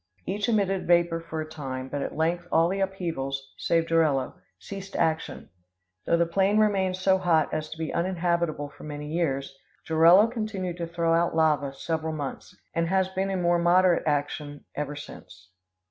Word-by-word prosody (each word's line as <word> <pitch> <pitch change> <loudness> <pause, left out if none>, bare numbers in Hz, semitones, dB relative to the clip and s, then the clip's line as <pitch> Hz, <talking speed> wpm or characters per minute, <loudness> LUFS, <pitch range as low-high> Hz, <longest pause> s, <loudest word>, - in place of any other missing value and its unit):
Each 205 +3 -1
emitted 195 -4 +1
vapor 170 -1 +3
for 160 -1 -5
a 155 - -5
time; 135 -4 -6
but 145 +1 -4
at - - -4
length 170 +2 0
all 165 +1 +4
the 195 +1 -2
upheavals, 160 -8 -3
save 165 -1 +1
Jorullo, 155 -6 +2 0.2
ceased 195 0 -9
action, 160 -2 -1 0.6
though 170 - +3
the 170 - +3
plain 195 +4 +2
remained 195 -4 +2
so 190 0 +3
hot 165 -4 +2
as 155 0 -2
to 160 - -8
be 160 -1 -4
uninhabitable 170 -4 -1
for - - -15
many 150 0 -6
years. 140 -5 -1 0.3
Jorullo 165 +5 +6
continued 215 -6 -4
to 170 -1 -3
throw 165 0 0
out 170 0 +2
lava 150 -3 +2
several 160 +2 -3
months, 145 -3 -6 0.2
and 165 0 0
has 190 0 +2
been 190 +1 -2
in 190 -2 -1
more 175 0 +3
moderate 175 0 +3
action 145 0 -2
ever 145 0 -3
since. 95 -10 -12
165 Hz, 175 wpm, -26 LUFS, 150-185 Hz, 0.6 s, Jorullo